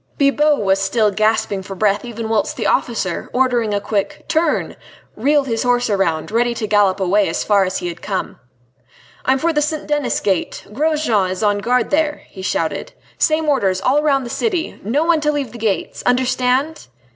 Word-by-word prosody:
Bibot 295 +1 +3
was 195 0 +2
still 210 +2 +2
gasping 215 -1 0
for 195 +1 -8
breath 205 +1 +1
even 230 -2 -5
whilst 220 -1 -1
the - - -2
officer, - - -1
ordering 245 -4 +1
a 205 - 0
quick 205 -1 -3
"Turn!" 320 -1 0 0.4
reeled 285 +5 +2
his 230 -3 -2
horse 245 -2 +1
round, 170 -4 0
ready 235 +1 +1
to 225 - -3
gallop 205 -2 +2
away 195 0 +2
as 165 - -2
far 200 -2 +3
as 185 +1 -2
he 175 - -4
had 170 0 -7
come. 195 -2 -4 0.9
"I 260 - +4
am - - +1
for 330 +4 0
the 300 - +1
St. 300 +1 -2
Denis 295 -2 0
Gate 190 -4 -2
Grosjean 285 -8 +1
is 185 +3 -3
on 205 -1 +2
guard 245 +2 0
there!" 300 0 0
he 190 - -10
shouted. 185 - -2 0.3
"Same 310 0 +2
orders 200 -10 +1
all 265 +8 +2
round 275 -3 +1
the 235 - -6
city. 370 -8 -2
No 255 +10 +1
one 330 -2 +2
to 300 0 +2
leave 280 -5 -3
the 235 - -10
gates!... 215 -3 -2
Understand?" 255 +4 0
235 Hz, 190 wpm, -19 LUFS, 200-290 Hz, 0.9 s, I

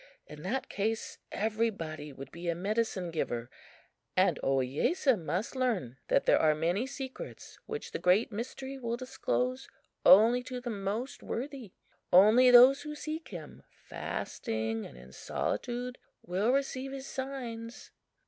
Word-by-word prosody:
In 150 0 -11
that 240 +11 -2
case 220 +2 -2
everybody 200 -9 -2
would 135 0 -10
be 170 +1 -5
a 170 - +1
medicine 195 -1 -1
giver, 120 -7 -3 0.7
and - - +4
Ohiyesa 135 - +2
must 180 - -3
learn 215 - -1
that - - +2
there - - +5
are 155 -1 +4
many 175 +10 0
secrets 275 - -8
which 450 +1 -5
the 460 - -3
Great 190 +6 +3
Mystery 265 +5 -5
will 235 -1 -2
disclose 255 0 -2 0.4
only 230 +5 +7
to 250 0 -6
the 245 -1 -4
most 215 +5 -3
worthy. 255 -4 -5 0.4
Only 215 +8 +7
those 250 +3 +8
who 300 0 -6
seek 310 +2 -5
him 165 -6 -9
fasting 110 0 -4
and 60 - -14
in 65 +1 -13
solitude 245 - -3 0.3
will 195 +7 +1
receive 270 0 -1
his 270 -1 -6
signs." 245 -4 -6
230 Hz, 140 wpm, -31 LUFS, 170-255 Hz, 0.7 s, those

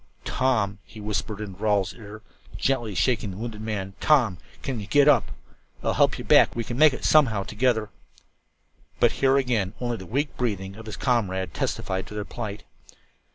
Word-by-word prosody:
"Tom," 110 -6 0
he 110 - -13
whispered 105 0 -3
into 100 -2 -7
Rawle's 100 -3 +1
ear, 110 -1 -11 0.3
gently 120 -7 0
shaking 115 -3 +1
the 95 - -7
wounded 110 -1 -6
man. 100 -3 -4
"Tom, 120 - +3 0.2
can 130 -5 -3
you 100 - -7
get 145 +3 +4
up? 150 - +4 0.5
I'll - - +1
help - - +3
you - - -6
back. - - +5
We 115 - -1
can 120 +2 -5
make 155 +3 +6
it 130 - -5
somehow 120 -10 +4
together." 110 0 0 1.1
But - - +5
here 135 0 +4
again 115 -7 0
only 120 -2 -2
the 95 - -10
weak 140 - -1
breathing 100 -5 -2
of 110 +1 -11
his 110 - -6
comrade 95 - 0
testified 95 0 -2
to 105 - -9
their 105 -1 -3
plight. 105 -3 -6
110 Hz, 180 wpm, -25 LUFS, 100-125 Hz, 1.1 s, make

